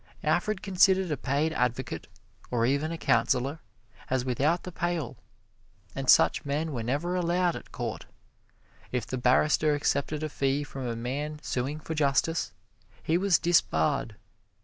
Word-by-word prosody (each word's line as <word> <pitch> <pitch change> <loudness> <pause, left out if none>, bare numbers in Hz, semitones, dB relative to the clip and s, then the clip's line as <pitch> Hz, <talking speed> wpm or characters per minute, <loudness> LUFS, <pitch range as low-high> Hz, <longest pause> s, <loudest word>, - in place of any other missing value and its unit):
Alfred 215 -3 0
considered 190 -2 +3
a - - +1
paid 145 +4 0
advocate, 125 -5 -2 0.4
or 115 -2 +1
even 140 +5 0
a 165 - -4
counselor, 135 0 +1 0.5
as 130 -1 0
without 145 +7 +1
the 180 - -7
pale, 175 -6 -2 0.8
and - - -4
such 80 - +5
men 150 +3 -2
were 125 -5 -3
never 145 +10 -1
allowed 175 0 +1
at - - -10
court. - - -5 0.8
If 125 -3 -1
the 130 - -4
barrister 150 +4 +3
accepted 145 +1 -1
a 155 - -2
fee 140 0 0
from 135 -3 -6
a 115 - -2
man 140 +6 -3
suing 135 +5 -2
for 160 - -5
justice, 150 +2 +1 0.5
he 160 - +1
was 185 -1 +4
disbarred. 150 - +1
145 Hz, 150 wpm, -28 LUFS, 130-165 Hz, 0.8 s, such